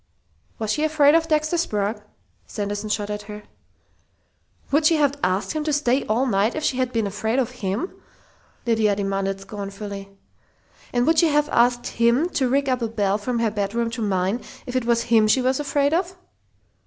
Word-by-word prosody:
"Was 215 -1 -1
she 300 - -1
afraid 300 -2 +4
of 325 0 +3
Dexter 310 +2 +1
Sprague?" 210 -8 -1 0.5
Sanderson 205 +1 -4
shot 210 0 -1
at 210 0 -4
her. 210 0 -8 1.3
"Would 305 +2 +4
she 330 - +4
have 285 -2 +2
asked 185 +7 0
him 310 -1 -2
to 310 - 0
stay 280 -2 +1
all 230 +5 +1
night 210 -1 +1
if 310 - -3
she'd 255 -2 0
been 225 -3 0
afraid 220 +4 -2
of 255 -4 0
him?" 200 - -2 0.7
Lydia 220 -3 +2
demanded 195 -1 -2
scornfully. 200 0 -7 0.8
"And 245 0 +1
would 320 +1 +4
she 335 - +5
have 295 0 +2
asked 240 +1 +2
him 235 +8 +2
to 265 -7 0
rig 275 +2 +1
up 255 -1 0
a 230 - 0
bell 205 -2 0
from 240 +3 -2
her 230 -2 +1
bedroom 215 +3 -1
to 230 0 -5
mine, 195 +2 0 0.2
if 250 - -6
it 255 -2 0
was 235 -1 +2
him 225 -2 +4
she 215 - +4
was 260 +1 +1
afraid 285 0 +1
of?" 365 +2 -1
235 Hz, 185 wpm, -23 LUFS, 210-285 Hz, 1.3 s, she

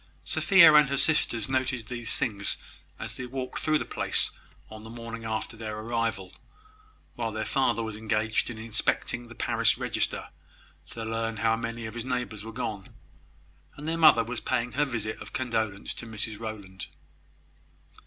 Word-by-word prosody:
Sophia 180 -6 +7
and 150 -2 +7
her 140 - 0
sisters 130 -6 +2
noted 130 -3 0
these 120 -2 -1
things 100 -4 +1 0.4
as - - -5
they 130 - -6
walked 130 0 -4
through 155 0 +3
the - - -3
place - - +1 0.4
on 110 0 -10
the 110 - -9
morning 115 -1 -7
after 110 0 -3
their 110 -1 -5
arrival, 110 -4 -2 0.8
while 115 -2 -2
their 110 0 -3
father 130 -3 +1
was 110 -1 -4
engaged 110 +1 0
in 120 - -6
inspecting 115 +2 -1
the 120 - -11
parish - - +2
register, - - -1 0.6
to 115 -1 -6
learn 115 0 -2
how 115 +1 +3
many 115 0 -4
of 110 - -6
his 120 -1 -4
neighbours 125 -4 -3
were 110 - -7
gone, 110 -4 -4 0.9
and 150 - -7
their 165 - +1
mother 155 -8 +7
was 120 +1 -4
paying 120 +1 0
her 145 +2 +2
visit 110 -5 -3
of - - -9
condolence 110 -5 -1
to 120 - -7
Mrs 110 -1 -3
Rowland. 100 -4 -6
115 Hz, 165 wpm, -28 LUFS, 110-125 Hz, 0.9 s, Sophia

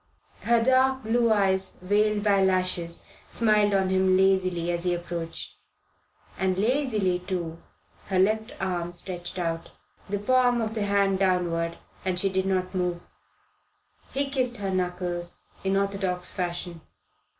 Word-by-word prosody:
Her 235 0 +2
dark 260 +1 +3
blue 230 +1 +2
eyes, 190 -2 +1
veiled 205 +2 +1
by 200 -2 +4
lashes, 185 -2 0 0.2
smiled 210 -2 +3
on 190 -1 +2
him 185 0 +3
lazily 185 -3 +2
as 170 0 -2
he 180 -1 +1
approached; 170 -1 -5 0.8
and 185 -1 +1
lazily, 215 -5 +1
too, 175 -3 -4 0.5
her 190 - 0
left 215 +4 +2
arm 175 -2 -2
stretched 175 0 -5
out, 165 -2 -2 0.4
the 205 - 0
palm 245 +3 +3
of 220 -1 -2
the 215 -2 -1
hand 200 -1 +2
downward, 175 -3 +1 0.3
and 185 -1 -1
she 195 +2 +1
did 190 0 0
not 185 -1 0
move. 180 -2 -2 1.0
He 280 +1 0
kissed 255 -3 0
her 195 -1 -2
knuckles, 180 -1 -3 0.2
in 195 0 +1
orthodox 195 -2 -1
fashion. 175 -2 -3
190 Hz, 140 wpm, -26 LUFS, 180-210 Hz, 1.0 s, by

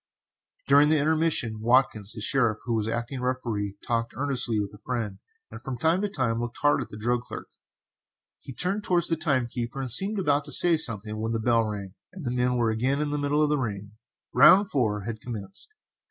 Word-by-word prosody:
During 145 +2 +6
the 155 - +4
intermission 150 -7 +1
Watkins, 115 -3 +2
the 110 - -7
sheriff, 115 -2 +2
who 120 - -1
was 110 -1 0
acting 120 +3 -3
as - - -6
Referee, 115 -6 -3
talked 115 0 -1
earnestly 130 -5 0
with 100 -1 -4
a 105 - -13
friend, 115 -6 -3 0.3
and - - -9
from 130 -2 -5
time 165 +8 +2
to 205 - -1
time 115 -9 -1
looked 120 -1 -5
hard 145 - +3
at - - -7
the 105 - -9
drug 120 +3 0
clerk. 125 - -9 0.9
He - - -10
turned 190 +10 -2
towards 175 -3 +1
the 165 - +2
time 140 -6 +1
keeper 120 +2 -5
and 130 -3 -3
seemed 195 - +3
about 145 -6 +1
to 145 - -6
say 170 +5 +5
something, 110 -8 -1
when 110 +1 -2
the 115 - -1
bell 115 0 +2
rang 100 -3 -6 0.2
and 185 -6 -9
the 120 - -1
men 125 0 0
were 115 -2 +1
again 130 +6 0
in 150 -1 -1
the 145 - -1
middle 145 +1 +1
of 150 - +1
the 150 -1 +1
ring. 105 -4 -4 0.4
Round 195 +2 +6
4 110 -7 0
had 110 0 -6
commenced. 105 - -7
125 Hz, 215 wpm, -26 LUFS, 110-145 Hz, 0.9 s, During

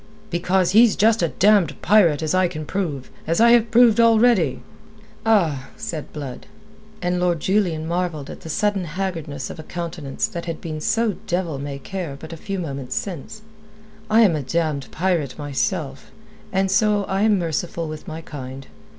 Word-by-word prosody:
"Because 180 +1 +1
he's 225 +2 +6
just 220 0 +3
a 170 - +3
damned 190 -4 +3
pirate, 170 -7 +4
as 155 - 0
I 185 0 +3
can 155 -3 -6
prove, 150 -8 -3 0.2
as 165 +1 +1
I 235 +1 +7
have 235 -1 +5
proved 235 -1 +5
already." 230 -1 +4 0.6
"Ah!" 165 -12 +2
said 175 -9 -5
Blood, 140 -4 -7 0.6
and 180 0 0
Lord 175 -2 +1
Julian 175 -4 0
marvelled 170 -4 -2
at - - -10
the 160 - -9
sudden 200 +2 0
haggardness 165 -5 -4
of - - -10
a - - -4
countenance 165 -4 -4
that 170 -1 -6
had 165 -2 -4
been 155 -2 -5
so 225 +2 +1
devil 175 -5 -1
may 140 0 -5
care 165 -1 -5
but 160 +2 -9
a - - -5
few 195 +4 -5
moments 140 -7 -4
since. 195 +3 -5 0.7
"I 220 +2 +5
am 195 -8 +5
a 150 - -2
damned 145 -1 -1
pirate, 165 -6 -1
myself; 145 -3 -3 0.4
and 190 0 +1
so 210 0 +3
I 195 0 -1
am 215 -1 +4
merciful 170 -1 -2
with 155 0 -8
my 160 +1 -6
kind. 135 -3 -8
170 Hz, 175 wpm, -22 LUFS, 155-200 Hz, 0.7 s, I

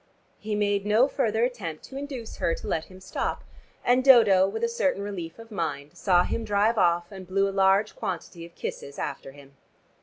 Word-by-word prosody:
He 210 0 -3
made 205 -1 +1
no 215 +5 +4
further 225 -5 0
attempt 200 -11 -3
to 265 - -11
induce 270 -5 -6
her 165 - 0
to - - -9
let 160 - -1
him 185 0 -14
stop, 190 - -3 0.4
and 250 +1 +4
Dodo, 215 -8 +7
with 200 - -4
a - - +4
certain 285 - 0
relief 175 -5 -6
of 230 0 -13
mind, 150 -6 -4
saw 180 -3 +3
him 230 - -3
drive 215 +1 +2
off 175 0 +2
and 190 -2 -9
blew 195 +2 +1
a - - -2
large 195 +2 +3
quantity 170 -1 -5
of 170 0 -13
kisses 140 - -6
after 135 - -5
him. 140 0 -16
200 Hz, 195 wpm, -26 LUFS, 175-225 Hz, 0.4 s, Dodo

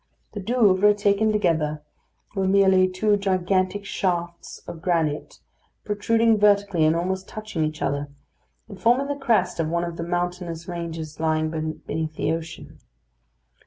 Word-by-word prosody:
The 205 - -6
Douvres, 205 -2 +3
taken 205 +2 +2
together, 160 -7 0 0.5
were 190 -1 0
merely 190 -1 +5
two 205 +3 +1
gigantic 190 +1 0
shafts 175 -3 -3
of 170 -2 -8
granite 160 -4 -1 0.5
protruding 225 +2 +2
vertically 200 -5 +3
and 155 +1 +3
almost 190 +2 -2
touching 215 -7 -4
each 155 -1 -3
other, 140 +1 -2 0.6
and 200 -4 -11
forming 245 +6 +3
the 285 0 -2
crest 185 -9 +1
of 165 - +1
one 170 +1 0
of 170 -1 -5
the 165 - -3
mountainous 175 -1 -3
ranges 165 -3 -6
lying 155 0 0 0.3
beneath 160 -1 -3
the 155 - -1
ocean. 165 0 -6
180 Hz, 140 wpm, -24 LUFS, 165-205 Hz, 0.6 s, merely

